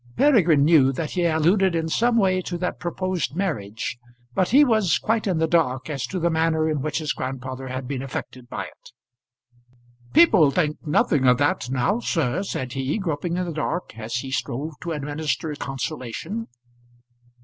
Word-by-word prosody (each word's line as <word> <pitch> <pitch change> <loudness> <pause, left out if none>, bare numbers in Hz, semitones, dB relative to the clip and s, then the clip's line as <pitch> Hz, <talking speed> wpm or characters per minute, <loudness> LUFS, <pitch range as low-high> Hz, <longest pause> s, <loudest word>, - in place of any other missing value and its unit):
Peregrine 180 - +5
knew 150 -5 +5
that 150 +3 -4
he 175 -1 0
alluded 170 +3 +3
in 165 -1 0
some 235 +8 +2
way 185 -3 +3
to 175 -1 -4
that 180 +1 -3
proposed 180 -2 -2
marriage, 120 - -3 0.3
but 185 - +1
he 285 +5 +6
was 220 - +3
quite 220 -1 0
in 185 -4 +1
the 160 - +2
dark 150 -5 +1
as 140 -3 -3
to 190 - -4
the 170 0 +1
manner 160 0 +1
in 155 -3 -1
which 155 +2 -2
his 155 -2 -1
grandfather 130 0 -5
had 130 0 -5
been 135 -1 -3
affected 130 -2 -7
by - - -4
it. - - -15 1.2
"People 215 - +6
think 150 0 0
nothing 145 -2 +2
of 125 -1 +5
that 145 -3 0
now, 135 - +1
sir," 165 - 0
said 130 -10 -4
he, 135 +4 -1
groping 170 -2 -2
in 180 - -1
the 170 - -4
dark 160 -1 -3
as 110 +1 -5
he 130 +2 -3
strove 140 +4 -3
to 170 - -4
administer 150 +1 -2
consolation. 145 - -5
160 Hz, 175 wpm, -23 LUFS, 135-180 Hz, 1.2 s, he